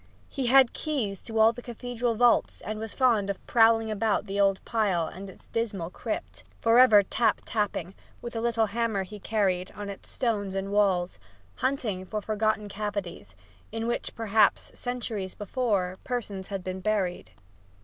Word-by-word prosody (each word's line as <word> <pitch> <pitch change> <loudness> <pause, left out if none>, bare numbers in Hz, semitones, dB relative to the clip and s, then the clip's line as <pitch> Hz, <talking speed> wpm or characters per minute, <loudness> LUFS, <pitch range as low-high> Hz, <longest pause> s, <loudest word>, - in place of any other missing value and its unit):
He 270 -3 -2
had 260 0 +6
keys 230 -11 -2
to 225 -1 -5
all 220 +1 +6
the 245 - -9
cathedral 240 0 -3
vaults 240 +1 +3
and 215 0 -5
was 220 -1 -6
fond 230 -7 +3
of 200 - -4
prowling 225 -1 +4
about 215 0 0
the 200 0 -3
old 195 -1 +3
pile 200 -7 +1
and 190 +4 -8
its 190 - -15
dismal 200 -7 -3
crypt, - - -5 0.2
for 230 +1 +5
ever 220 -5 +8
tap 225 +4 +1
tapping, 200 -5 -2 0.3
with 240 0 -7
a 225 - -1
little 230 -1 +2
hammer 220 -2 -1
he 205 +3 -10
carried, 190 -4 0
on 205 0 -6
its 195 - -11
stones 205 -6 -1
and 195 +1 -3
walls, 185 - +1 0.4
hunting 235 -8 -1
for 215 +3 -4
forgotten 215 0 0
cavities, 200 - -5 0.4
in 225 +1 -3
which, 235 - -2
perhaps, 220 -2 +2
centuries 230 -6 -4
before, 205 -5 -1
persons 205 -7 -4
had 195 -2 -4
been 185 0 -4
buried. 185 - -1
215 Hz, 165 wpm, -27 LUFS, 195-230 Hz, 0.4 s, ever